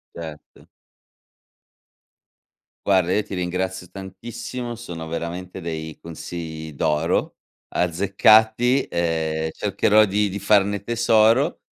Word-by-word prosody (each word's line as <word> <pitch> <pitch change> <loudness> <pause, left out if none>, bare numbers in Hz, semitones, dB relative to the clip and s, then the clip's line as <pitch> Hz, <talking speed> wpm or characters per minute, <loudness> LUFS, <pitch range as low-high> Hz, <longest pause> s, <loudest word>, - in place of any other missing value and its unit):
Certo. 80 -3 -10 2.2
Guarda, 95 -3 +3
io 105 - +2
ti 100 -2 -7
ringrazio 90 0 -3
tantissimo, 120 +5 -7
sono 85 -8 -7
veramente 85 +3 -5
dei 80 -2 -5
consigli 80 -1 -7
d'oro, 75 +2 0 0.3
azzeccati, 110 +8 +3
ehm, 80 -2 -1
cercherò 105 +3 +3
di 105 +1 +1
di 100 +2 -5
farne 100 -1 +2
tesoro, 115 +5 +3
95 Hz, 90 wpm, -22 LUFS, 85-110 Hz, 2.2 s, Guarda